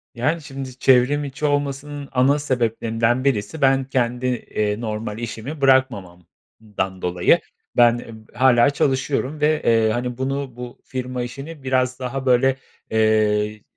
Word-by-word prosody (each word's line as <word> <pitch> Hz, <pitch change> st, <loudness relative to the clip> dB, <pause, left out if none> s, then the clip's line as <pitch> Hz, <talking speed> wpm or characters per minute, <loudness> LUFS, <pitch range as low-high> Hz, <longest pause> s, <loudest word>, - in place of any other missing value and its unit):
Yani, 150 Hz, +8 st, 0 dB
şimdi 135 Hz, -3 st, -8 dB
çevrim 135 Hz, +3 st, +4 dB
içi 140 Hz, +1 st, -4 dB
olmasının 145 Hz, 0 st, -2 dB
ana 135 Hz, +3 st, +3 dB
sebeplerinden 115 Hz, -2 st, 0 dB
birisi 135 Hz, +2 st, -1 dB
ben 135 Hz, 0 st, +4 dB
kendi, 125 Hz, -1 st, -1 dB
eee, 105 Hz, -3 st, -2 dB
normal 110 Hz, -1 st, -4 dB
işimi 120 Hz, +6 st, -6 dB
bırakmamamdan 100 Hz, -5 st, -1 dB
dolayı 90 Hz, 0 st, +3 dB, 0.4 s
ben, 120 Hz, -1 st, +6 dB
eee, 115 Hz, -1 st, -9 dB, 0.2 s
hâlâ 125 Hz, +1 st, +4 dB
çalışıyorum 140 Hz, +1 st, -1 dB
ve, 155 Hz, 0 st, +2 dB
eee, 115 Hz, -1 st, +3 dB
hani, 120 Hz, +1 st, -3 dB
bunu, 135 Hz, -1 st, -3 dB
bu 125 Hz, 0 st, -9 dB
firma 125 Hz, -1 st, -4 dB
işini 140 Hz, +5 st, -8 dB
biraz 130 Hz, -1 st, 0 dB
daha, 130 Hz, +1 st, -4 dB
böyle, 130 Hz, +1 st, +3 dB, 0.4 s
eee, 110 Hz, -1 st, +2 dB
125 Hz, 130 wpm, -21 LUFS, 115-135 Hz, 0.4 s, ben